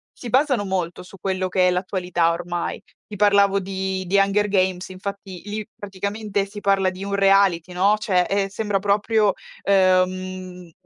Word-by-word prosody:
si 240 - -8
basano 260 -4 +2
molto 180 -2 -3
su 195 +2 -14
quello 185 -1 -2
che 180 0 +3
è - - +3
l'attualità 180 -2 0
ormai. 175 0 -4 0.2
Ti 210 - -9
parlavo 200 -1 +4
di 190 0 -3
di 190 +3 -1
Hunger 200 +1 +2
Games, 185 -2 0
infatti 190 -1 -7
lì 210 0 -5
praticamente 200 +1 -3
si 205 +1 -10
parla 195 -1 +2
di 185 +1 -8
un 200 0 -2
reality, 195 -3 +3
no. 200 +4 +3
Cioè, 190 -4 +1
eh, 195 0 0
sembra 205 -1 -1
proprio, 205 +1 +2 0.3
ehm, 185 -2 0
195 Hz, 160 wpm, -22 LUFS, 185-200 Hz, 0.3 s, parlavo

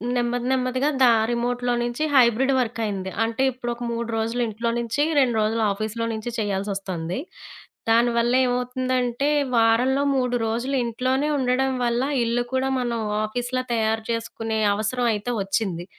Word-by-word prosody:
నెమ్మది 245 0 -1
నెమ్మదిగా 255 +2 +1
దా 245 - +7 0.2
రిమోట్‌లో 245 +1 -1
నించి 240 +5 -2
హైబ్రిడ్ 255 +1 +4
వర్కయింది. 220 -6 -2
అంటే, 230 +3 -1
ఇప్పుడొక 240 -1 -5
మూడ్రోజులు 230 0 -2
ఇంట్లో 225 +2 -2
నించి, 235 +5 0 0.2
రెండ్రోజులు 225 -3 +1
ఆఫీస్‌లో 220 +3 -3
నించి 220 +2 -4
చేయాల్సొస్తంది. 195 -4 -3 0.7
దానివల్ల 235 +1 +3
ఏమవుతుందంటే, 250 +1 0 0.3
వారంలో 245 +5 +3
3 250 -1 0
రోజులు 240 +5 -1
ఇంట్లోనే 255 +5 0
ఉండడం 265 0 +1
వల్ల, 235 +1 +1 0.2
ఇల్లు 235 +1 0
కూడా 260 0 +1
మనం 240 -2 -1 0.3
ఆఫీస్‌లా 245 +3 -2
తయారు 220 -1 0
చేసుకునే 225 -1 -3 0.2
అవసరం 235 +4 -1
అయితే 215 +3 -3
ఒచ్చింది. 195 -3 -2
235 Hz, 125 wpm, -23 LUFS, 225-250 Hz, 0.7 s, దా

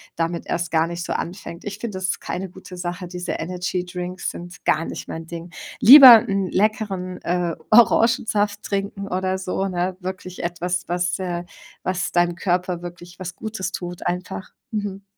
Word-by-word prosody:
damit 170 +1 -2
erst 170 -1 -2
gar 160 0 +3
nicht 170 0 -5
so - - -5
anfängt. 170 -1 -6
Ich 205 0 -5
finde 210 -4 -4
das 185 - -3
ist 185 - -1
keine 190 0 -4
gute 185 0 -11
Sache. 175 +1 -4
Diese 180 0 -4
Energydrinks 180 +1 -3
sind 175 +2 -10
gar 160 +2 +2
nicht - - -6
mein 165 0 -6
Ding. 170 0 -8 0.3
Lieber 255 -3 +12
'n 195 -1 0
leckeren, 195 -3 0
äh, 175 -1 0 0.2
Orangensaft 225 -2 +4
trinken 200 0 -3
oder 185 +1 -1
so, 190 +1 -2
ne? 180 0 -2
Wirklich 185 0 -6
etwas, 175 +1 -2
was 175 0 0
äh 175 -2 -3 0.4
was 185 0 -1
deinem 175 0 +2
Körper 180 -1 -1
wirklich 175 0 -10
was 180 -1 -6
Gutes 200 -4 -4
tut 175 -1 -6
einfach. 180 +2 -4 0.2
Mhm. 205 -2 -4
180 Hz, 165 wpm, -22 LUFS, 175-195 Hz, 0.4 s, Lieber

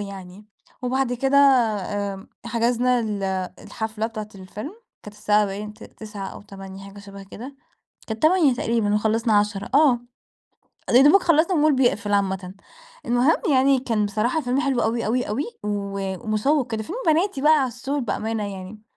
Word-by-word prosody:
يعني. 195 0 -9 0.4
وبعد 255 0 0
كده 270 +3 +1
آمم 205 -7 +1 0.2
حجزنا 240 +2 +1
ال 210 -3 -3 0.4
الحفلة 220 0 -4
بتاعة 215 -2 -7
الفيلم، 200 - -8 0.3
كانت 210 0 -11
الساعة 210 0 +2
باين 210 +2 -6
ت - - -13
تسعة 210 -3 -8
أو - - -10
20:00 195 -1 -10
حاجة 200 +1 -12
شبه 200 -1 -11
كده. 250 +8 -10 0.5
كانت 220 0 -6
20:00 310 -4 +4
تقريبًا 230 -5 0
وخلّصنا 220 +2 +1
22:00 205 -1 -2
آه. 280 -5 +5 0.9
أ - - 0
يا 245 - +7
دوبك 295 +8 +6
خلّصنا 335 +2 +3
والمول 305 -2 +3
بيقفل 215 -5 +1
عامةً. 190 -2 -1 0.5
المهم 245 +6 +3
يعني 270 0 +4
كان 225 -5 0
بصراحة 225 +9 0
فيلم 255 0 0
حلو 270 -5 0
أوي، 230 +1 -1
أوي، 245 +4 0
أوي 225 +8 -1 0.2
و 205 -1 -3 0.3
ومشوّق 240 +5 +1
كده، 220 -1 -2
فيلم 360 - -6
بناتي 320 -1 +2
بقى 300 -1 +5
عسول 260 +3 -3
بأمانة 225 -2 -2
يعني. 190 +3 -10
225 Hz, 160 wpm, -23 LUFS, 205-265 Hz, 0.9 s, يا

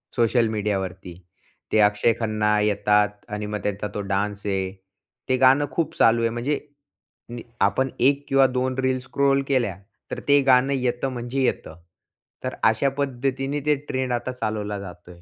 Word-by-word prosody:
Social 120 -1 +3
मीडियावरती. 95 -4 -3 0.6
ते 110 - +3
अक्षय 105 +3 +1
खन्ना 105 -1 +1
येतात 105 0 +2 0.2
आणि 105 0 -4
मग 105 0 -4
त्यांचा 105 0 -2
तो 105 - -2
डान्स 100 +1 -2
आहे, 95 -2 -1 0.6
ते 130 - +3
गाणं 135 +3 +5
खूप 165 +3 -2
चालू 115 +1 +4
आहे, 115 - +2
म्हणजे 120 +6 -2 0.7
नि 120 -1 -7 0.2
आपण 100 +7 +2
एक 140 +3 +2
किंवा 135 -1 +5
दोन 130 0 -1
रिल 130 -1 +1
स्क्रोल 140 +1 +1
केल्या, 120 -9 0 0.3
तर - - -3
ते 140 0 +6
गाणं 130 +1 +5
येतं 125 0 -1
म्हणजे 120 +2 -3
येतं. 80 -9 -2 0.7
तर - - -3
अशा 110 +5 +3
पद्धतीने 135 +1 -1
ते 150 0 +3
ट्रेंड 130 -1 -1
आता 120 +1 -2
चालवला 105 -4 -3
जातो 90 -2 -10
आहे. 85 -1 -16
120 Hz, 160 wpm, -23 LUFS, 105-130 Hz, 0.7 s, ते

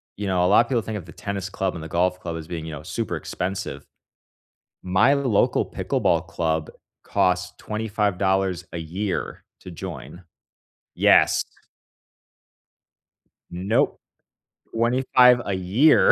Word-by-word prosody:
you 105 0 -4
know, 90 -2 +2
a - - +4
lotta 115 +5 +4
people 120 -4 +1
think 110 -1 -5
of 90 - -8
the 85 - -12
tennis 100 +2 -5
club 95 -1 -2
and 80 - -7
the - - -6
golf 90 +2 0
club 85 -2 -5
as 80 -1 -8
being, 80 -2 -5
you 80 - -6
know, 75 -1 -8
super - - -3
expensive. 95 +2 -4 1.0
My 100 +10 +3
local 130 -7 +2
pickleball - - 0
club 80 -2 -1 0.3
costs 90 0 0
$25 100 -4 -1
a 85 - -4
year 90 +5 -4 0.2
to - - -10
join. 85 +2 -8 0.7
Yes. - - +4 2.1
Nope. 95 +6 0 0.7
25 125 +1 +4
a 100 - -2
year 100 - +4
95 Hz, 130 wpm, -23 LUFS, 90-110 Hz, 2.1 s, a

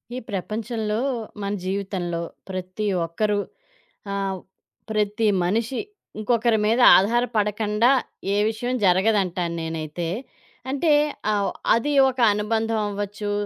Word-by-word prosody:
ఈ - - -3
ప్రపంచంలో, 215 +2 -2 0.4
మన 200 0 -2
జీవితంలో, 185 -3 -2 0.3
ప్రతి 185 +2 -4 0.2
ఒక్కరు 205 +5 0 0.7
ఆహ్, 195 -1 -2 0.5
ప్రతి 210 +1 +1 0.2
మనిషి 225 +7 0 0.4
ఇంకొకరి 230 0 +2
మీద 225 +3 +2 0.2
ఆధారపడకండా 215 0 +1 0.5
ఏ - - +1
విషయం 240 +3 -2
జరగదంటాను 185 -3 +2
నేనైతే. 160 +1 -4 0.6
అంటే 285 +4 +1 0.4
ఆహ్, 205 -1 +1 0.3
అది 290 +6 0 0.2
ఒక 260 -1 -6
అనుబంధం 220 +2 0
అవ్వచ్చు. 205 +1 -4
210 Hz, 100 wpm, -23 LUFS, 190-225 Hz, 0.7 s, ఇంకొకరి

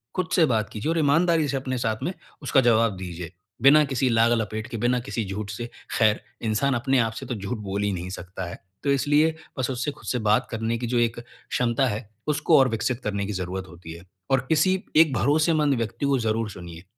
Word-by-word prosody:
खुद 185 -3 -1
से 165 - +5
बात 110 -7 0
कीजिए 110 +8 -4
और 165 - 0
ईमानदारी 160 +1 +3
से 140 -1 -1
अपने 130 -1 -3
साथ 110 -2 -2
में 180 - -2 0.3
उसका 135 -1 +3
जवाब 115 -3 +3
दीजिए, 90 -2 -7 0.3
बिना 145 +4 +7
किसी 135 -1 0
लाग-लपेट 115 -1 +1
के, 120 -2 -6
बिना 120 +3 +1
किसी 120 -3 -3
झूठ 100 +1 -5
से। 120 +3 -6 0.3
ख़ैर, 110 -2 +3 0.2
इंसान 115 +5 +1
अपने 130 +2 +1
आप 115 -1 +1
से - - -7
तो 125 - -4
झूठ 105 +4 -4
बोल 100 -1 -3
ही 105 - +1
नहीं 90 0 -5
सकता 95 0 -6
है। - - -9 0.2
तो 140 - +2
इसलिए, 145 +4 +3 0.2
बस 130 - 0
उसे 130 +3 -2
खुद - - -15
से 125 - 0
बात 110 +3 +3
करने 115 +1 -1
की 120 +1 -4
जो 120 +1 0
एक 115 0 0
क्षमता 120 +1 -1
है, 105 -1 -4 0.2
उसको 150 -1 +3
और 135 - +5
विकसित 115 +2 -1
करने 100 -1 -2
की 105 - -4
ज़रूरत 95 0 -4
होती 85 -2 -11
है। 85 +1 -12 0.3
और 135 - +5
किसी 185 +4 +3
एक 155 -2 +6
भरोसेमंद 150 +2 +2
व्यक्ति 115 +4 -3
को 140 -1 +2
ज़रूर 110 -1 -1
सुनिए, 85 -2 -10
120 Hz, 220 wpm, -25 LUFS, 105-140 Hz, 0.3 s, बिना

